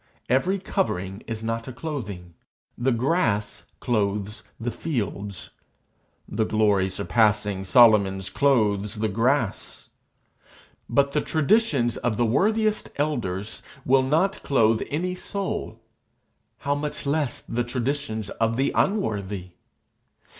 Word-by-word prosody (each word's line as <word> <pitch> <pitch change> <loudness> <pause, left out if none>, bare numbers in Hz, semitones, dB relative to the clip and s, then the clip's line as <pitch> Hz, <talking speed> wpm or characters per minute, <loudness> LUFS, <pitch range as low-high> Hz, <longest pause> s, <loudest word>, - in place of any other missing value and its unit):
Every 135 +11 +2
covering 100 - -2
is 115 -1 -5
not 115 0 -3
a - - -5
clothing. 110 - -6 0.4
The 130 +2 +1
grass 120 - 0
clothes 105 -1 -1 0.2
the 120 +1 -2
fields; 105 - -4 0.8
the 110 +1 0
glory 105 -3 +2
surpassing 105 -1 +1
Solomon's 100 -4 +5
clothes 105 -7 +2
the 110 +1 0
grass; 115 +2 -1 1.0
but 140 0 +3
the 150 - +1
traditions 155 - +2
of 115 -3 -1
the 120 - +2
worthiest 215 - +1
elders 110 -9 -2 0.2
will 135 +1 +5
not 160 +9 +1
clothe 115 -5 +3
any 175 +5 -1
soul 195 +1 -4 0.8
how 140 - -1
much 145 +1 -4
less 145 -1 0
the 120 +1 -2
traditions 120 -3 -3
of 115 0 0
the 135 +1 +2
unworthy! 100 - -1
115 Hz, 110 wpm, -25 LUFS, 105-145 Hz, 1.0 s, Solomon's